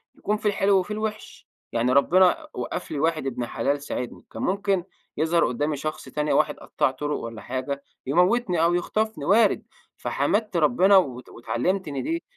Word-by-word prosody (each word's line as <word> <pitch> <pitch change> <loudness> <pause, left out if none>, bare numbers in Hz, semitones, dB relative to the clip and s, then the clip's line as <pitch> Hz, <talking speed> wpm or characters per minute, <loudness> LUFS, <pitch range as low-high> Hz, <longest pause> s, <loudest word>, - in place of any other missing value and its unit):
يكون 210 +1 -1
في 215 - -13
الحلو 195 -1 +3
وفي 185 +3 -4
الوحش، 215 0 -5 0.2
يعني 120 +2 +1
ربنا 180 +6 +4
وقف 125 - -5
لي 150 - -2
واحد 160 -1 0
ابن 120 -2 -3
حلال 140 +4 -1
ساعدني، 125 -4 -5
كان - - -7
ممكن 195 -1 +1 0.3
يظهر 165 +2 +3
قدامي 145 +5 -1
شخص 155 +2 -5
تاني 150 0 -1
واحد - - +2
قطَّاع - - 0
طرق 145 +3 -3
والّا 115 -2 -7
حاجة، 130 +5 -4 0.2
يموتني 180 - +2
أو 170 +1 +3
يخطفني 215 -1 -1
وارد، 215 +3 +4 0.3
فحمدت 210 -4 0
ربنا 180 +7 +5
وات 130 -9 0
واتعلمت 180 +10 -2
إن 140 -2 -3
دي 330 +2 -2
165 Hz, 165 wpm, -25 LUFS, 140-200 Hz, 0.3 s, ربنا